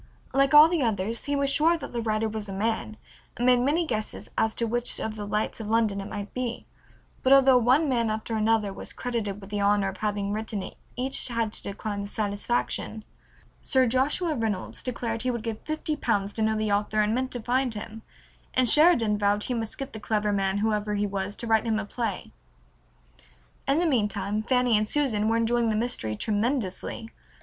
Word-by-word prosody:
Like 275 +1 +3
all 300 +1 +10
the 335 -2 0
others 225 -1 -1
he 285 - 0
was 280 0 +1
sure 320 +4 +3
that - - -8
the 235 - -1
writer 220 0 0
was 215 -1 -5
a - - -4
man, 220 +1 -2 0.4
and 245 - -1
made 250 -1 +5
many 295 +7 +1
guesses 215 -7 -4
as 220 0 +1
to 235 - 0
which 240 +2 0
of 220 -1 -3
the 205 -1 -6
lights 210 +3 -2
of 220 - -5
London 220 -3 +1
it 195 - -7
might 205 0 -6
be, 250 -2 -3 0.6
but 260 - +2
although 270 -2 +7
one 260 +7 +3
man 235 -4 +1
after 220 +1 -3
another 215 -2 +1
was - - -7
credited 225 -5 -3
with 195 0 -12
the 205 - -1
honor 200 -1 +3
of 195 - -8
having 205 -1 -2
written 215 -2 -3
it - - -9 0.2
each 260 +2 0
had 230 -3 -1
to - - -5
decline 205 +1 -4
the 200 - -5
satisfaction. 215 +1 -2 0.6
Sir 260 -1 +3
Joshua 280 +8 +1
Reynolds 220 -7 -3
declared 230 -2 -3
he 255 - 0
would 235 -3 -2
give 225 -2 -4
fifty 310 0 -2
pounds 205 -7 -1
to 220 - -3
know 220 0 +2
the 215 -1 -1
author 210 +1 +1
and 210 +1 +1
meant 255 +2 -1
to 245 - -3
find 245 +1 0
him, 220 +1 -7 0.5
and 255 -1 +3
Sheridan 235 -8 +4
vowed 205 0 +2
he 255 - -2
must 225 -2 -4
get 275 0 -6
the 220 - -6
clever 210 -1 0
man, 195 0 0
whoever 210 0 0
he 205 0 0
was, 200 0 -3
to 235 - -4
write 225 -1 +2
him 220 -1 +1
a 215 - -3
play. 215 -2 -4 1.4
In 275 - +3
the 345 - +2
meantime 210 - 0
Fanny 250 0 +2
and 210 0 +2
Susan 225 -6 +1
were 225 +1 +2
enjoying 230 0 +1
the 215 - +1
mystery 215 - -1
tremendously. 220 - -2
225 Hz, 210 wpm, -26 LUFS, 210-250 Hz, 1.4 s, all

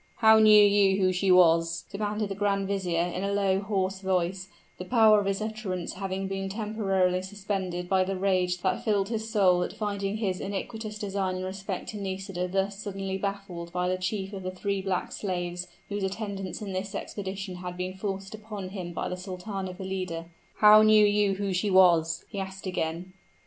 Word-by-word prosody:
"How 220 -1 +6
knew 215 -1 +8
you 200 -1 +4
who 185 -1 +3
she 190 +2 0
was?" 165 -2 +4
demanded 210 +1 -2
the - - -2
grand 200 -1 0
vizier, 180 -4 0
in 180 +2 -3
a 200 - -1
low, 195 -1 +2
hoarse 195 -2 -1
voice, 190 0 -1 0.3
the - - -4
power 220 -1 +5
of 200 - -2
his 195 +2 -1
utterance 215 -5 -4
having 190 0 -3
been 195 0 -3
temporarily 195 -3 0
suspended 190 -2 -4
by 190 0 +3
the 195 +1 -2
rage 185 -2 +1
that 185 -1 0
filled 205 -3 +1
his 220 -1 -3
soul 190 -5 +4
at - - -2
finding 200 -1 -2
his 195 -4 -1
iniquitous 210 +2 -5
design 195 -2 -2
in 185 - -4
respect 190 0 -5
to 215 - -6
Nisida 190 -2 -3
thus 195 +2 -1
suddenly 195 -2 -4
baffled 195 -4 -4
by 180 +1 -1
the 185 - +1
chief 190 +2 -3
of 195 - -5
the 185 - -3
three 195 +1 -2
black 190 -1 -2
slaves, 180 -2 -3 0.2
whose 205 0 -3
attendance 195 0 -4
in 195 -2 -5
this 195 +2 -4
expedition 195 -2 -5
had 180 0 -6
been 185 +1 -3
forced 195 0 -5
upon 210 -3 -7
him 180 -3 -6
by - - -3
the 180 - -3
Sultana 190 +1 -5
Valida; 185 -3 -4 0.3
"how 210 0 +8
knew 215 -1 +6
you 205 -1 +2
who 200 -1 -2
she 185 +3 0
was?" 170 -3 +4
he 200 - -6
again 185 -3 -3
asked. 185 - -20
195 Hz, 190 wpm, -28 LUFS, 185-205 Hz, 0.3 s, knew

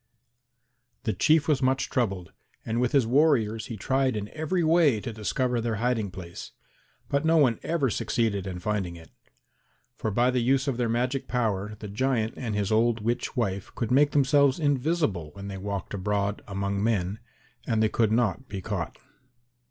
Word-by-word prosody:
The 110 - 0
Chief 155 -2 +3
was 150 -4 +2
much 130 0 +1
troubled, 95 -8 -1 0.3
and 115 +2 -1
with 125 - +1
his 135 -4 +3
warriors 115 -5 +2
he 115 - -6
tried 130 +2 +1
in 105 0 -4
every 160 +3 -1
way 160 -7 +4
to 115 +2 -6
discover 120 +3 -1
their 115 -1 -1
hiding 115 -2 0
place, 90 -2 -9 0.5
but 140 +1 0
no 165 +1 +4
one 130 -7 +3
ever 150 -7 0
succeeded 100 -3 -1
in 90 -1 -4
finding 95 -2 -2
it. 80 -1 -14 0.8
For - - -2
by 120 +4 +2
the 125 - +1
use 130 +3 +2
of 135 -4 0
their 120 -2 0
magic 125 +3 -1
power 105 -4 -1
the 105 - -7
giant 110 +1 0
and 115 -5 -4
his 100 -1 -1
old 115 +1 +2
witch 120 +4 -2
wife 100 -5 -1
could 115 -1 -2
make 145 +3 +5
themselves 140 0 +3
invisible 145 - 0
when 100 0 -8
they 95 - -5
walked 100 0 -4
abroad 100 +1 -1
among 100 0 -2
men 105 -2 0 0.5
and 110 -1 +2
they - - +4
could 110 0 +1
not 120 +3 +1
be 100 - -4
caught. 90 - -4
115 Hz, 175 wpm, -27 LUFS, 100-130 Hz, 0.8 s, make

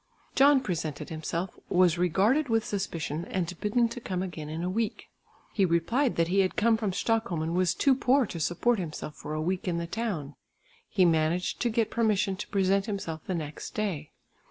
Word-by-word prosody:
John 275 0 +6
presented 165 - -3
himself, 165 +3 -4
was 175 -2 +4
regarded 205 - +2
with 225 -1 +2
suspicion 170 -5 -3
and 180 -2 -2
bidden 235 +3 +2
to 240 +1 -7
come 185 -4 -2
again 155 -5 -6
in 160 +2 -4
a - - -1
week. 215 +4 -2 0.4
He 200 - +2
replied 190 - +2
that 165 0 +2
he 195 +2 +2
had 190 -1 +2
come 230 +1 +4
from 215 -3 -1
Stockholm 220 -4 0
and 165 +1 -2
was 180 0 +2
too 275 - +4
poor 260 +1 +3
to 170 - -6
support 195 +9 +1
himself 155 -3 -5
for 150 +1 -6
a 155 - -1
week 185 +2 -2
in 170 -2 0
the 170 - -2
town. 170 -8 -3 0.6
He 190 -3 +3
managed 165 +2 +1
to 240 - +1
get 225 -1 0
permission 210 -3 +1
to 210 - -5
present 195 +1 +1
himself 170 -7 -4
the 185 - -1
next 155 -2 -6
day. 185 -9 -2
185 Hz, 195 wpm, -28 LUFS, 165-225 Hz, 0.6 s, John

